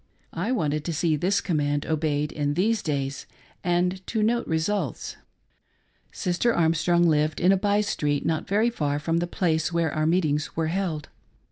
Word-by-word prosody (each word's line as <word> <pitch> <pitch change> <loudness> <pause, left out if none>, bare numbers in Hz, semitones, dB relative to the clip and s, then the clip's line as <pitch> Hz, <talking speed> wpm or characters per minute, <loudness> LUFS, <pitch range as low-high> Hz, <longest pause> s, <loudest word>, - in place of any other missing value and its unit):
I 180 +9 -2
wanted 150 - 0
to 170 - -2
see 160 +1 +1
this 190 +6 +1
command 145 -4 0
obeyed 150 -1 0
in 145 -1 -1
these 215 +6 +1
days, 140 -2 -3 0.4
and 180 +1 0
to 220 -2 0
note 235 +2 +1
results. 160 - -2 1.0
Sister 185 +7 0
Armstrong 170 +1 +2
lived 155 -1 +1
in 180 - +4
a - - +5
by 205 +1 +2
street 145 -8 -1
not 160 -1 -1
very 215 +4 +2
far 145 -9 -1
from 165 +3 -1
the 175 +1 0
■place 160 -2 0
where 170 -3 0
our 155 0 0
meetings 155 -4 0
were 160 -1 0
held. 170 -4 -2
165 Hz, 165 wpm, -25 LUFS, 150-185 Hz, 1.0 s, a